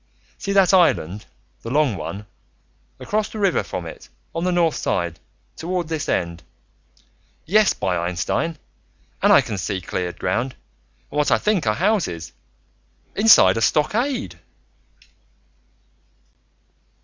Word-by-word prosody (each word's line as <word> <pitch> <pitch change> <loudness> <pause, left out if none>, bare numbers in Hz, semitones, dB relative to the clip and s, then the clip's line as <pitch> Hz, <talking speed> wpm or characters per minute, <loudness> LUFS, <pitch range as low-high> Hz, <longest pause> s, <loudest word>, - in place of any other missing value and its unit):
"See 200 - -3
that 195 -2 +4
island, 105 - +2 0.3
the 115 - -6
long 140 -3 +2
one? 100 +2 -6 0.7
Across 215 0 -1
the - - -8
river 195 -4 +2
from 90 - -6
it, 80 - -10 0.2
on 165 - -3
the 180 - +1
north 170 -3 +2
side, 85 -2 -2 0.4
toward 175 0 -3
this 160 -2 -3
end. 85 -1 -1 1.0
Yes, 210 +3 +3
by 90 -2 -1
Einstein! 95 - -2 0.6
And - - +4
I - - +7
can 105 - -5
see 95 +2 -2
cleared 90 0 -4
ground, 120 +8 -1 0.6
and 145 - -5
what 150 - +2
I - - +4
think 205 - 0
are 105 - +2
houses, 110 - -1 0.8
inside 195 - +6
a - - -1
stockade...." 155 - 0
145 Hz, 125 wpm, -22 LUFS, -, 1.0 s, I